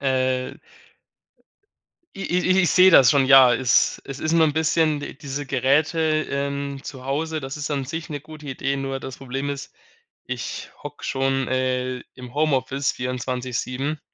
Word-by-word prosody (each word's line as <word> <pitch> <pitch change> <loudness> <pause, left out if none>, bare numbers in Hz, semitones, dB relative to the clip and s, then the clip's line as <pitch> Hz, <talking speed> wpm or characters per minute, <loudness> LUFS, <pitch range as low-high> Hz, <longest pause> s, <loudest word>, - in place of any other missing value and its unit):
äh 130 -1 0 1.6
i 195 - -6
i 180 - 0
i 185 - +4
ich 175 - +2
sehe 185 0 +7
das 130 -7 +8
schon. 140 -2 +4
Ja, 130 -2 +8
es 125 -2 +2
es 135 0 -8
ist 155 - -1
nur 165 -1 +5
'n 155 - +1
bisschen 160 -1 +2
di 145 - -7
diese 140 0 -5
Geräte, 155 +4 +1
ähm, 140 0 -3
zu 130 -2 -9
Hause, 155 +4 -2
das 135 -2 -6
ist 150 0 -4
an 140 -2 -2
sich 165 +4 -6
'ne 145 -2 -4
gute 155 0 -12
Idee. 135 +1 -2
Nur 135 -1 -3
das 130 -1 -7
Problem 135 +1 -4
ist, 140 0 -6 0.5
ich - - -5
hocke 145 0 -9
schon, 135 -1 0
äh, 130 0 -1 0.2
im 125 -1 -10
Homeoffice 140 -2 0
24/7. 125 +3 -3
140 Hz, 165 wpm, -23 LUFS, 130-150 Hz, 1.6 s, das